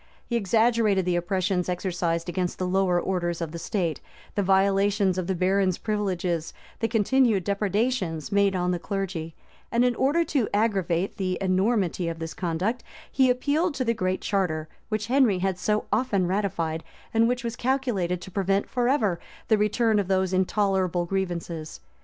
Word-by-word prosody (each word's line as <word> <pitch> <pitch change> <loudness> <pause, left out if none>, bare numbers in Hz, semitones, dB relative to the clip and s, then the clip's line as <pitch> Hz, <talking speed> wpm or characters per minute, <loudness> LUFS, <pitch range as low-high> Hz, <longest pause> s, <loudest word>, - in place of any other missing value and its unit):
He 235 - -3
exaggerated 220 -2 +2
the 180 -1 +1
oppressions 180 +1 0
exercised 175 -2 -1
against 180 0 -2
the 185 - -2
lower 180 -1 +2
orders 175 -2 -1
of 165 -3 -4
the 170 - -6
state, 170 - -2 0.3
the 205 - 0
violations 195 0 +2
of 180 - -3
the 190 - 0
barons' 185 0 +2
privileges, 185 -6 -2 0.2
the 225 - +1
continued 225 -1 +2
depredations 200 - -1
made 200 -1 +3
on 180 0 0
the 175 - -1
clergy; 180 -4 -4 0.4
and 235 +1 +3
in 250 - +3
order 285 +8 +2
to 265 -10 0
aggravate 195 -4 0
the 185 -2 -1
enormity 190 -2 +1
of 165 -1 -3
this 165 0 -5
conduct, 185 +7 -2 0.3
he 260 -1 +3
appealed 290 +6 +1
to 255 - -1
the 230 - +2
Great 185 -4 -1
Charter, 165 -6 -1 0.2
which 215 -1 -1
Henry 250 -6 +3
had 185 0 -1
so 210 +2 0
often 210 -5 +1
ratified, 175 -4 -1 0.3
and 225 0 +4
which 245 0 -1
was 235 0 -3
calculated 235 -10 -1
to 190 - -9
prevent 195 +1 0
forever 240 -8 +1 0.3
the 220 - +5
return 210 +1 +2
of 200 - -1
those 190 -1 +1
intolerable 185 -2 +1
grievances. 170 - -3
195 Hz, 165 wpm, -26 LUFS, 180-220 Hz, 0.4 s, the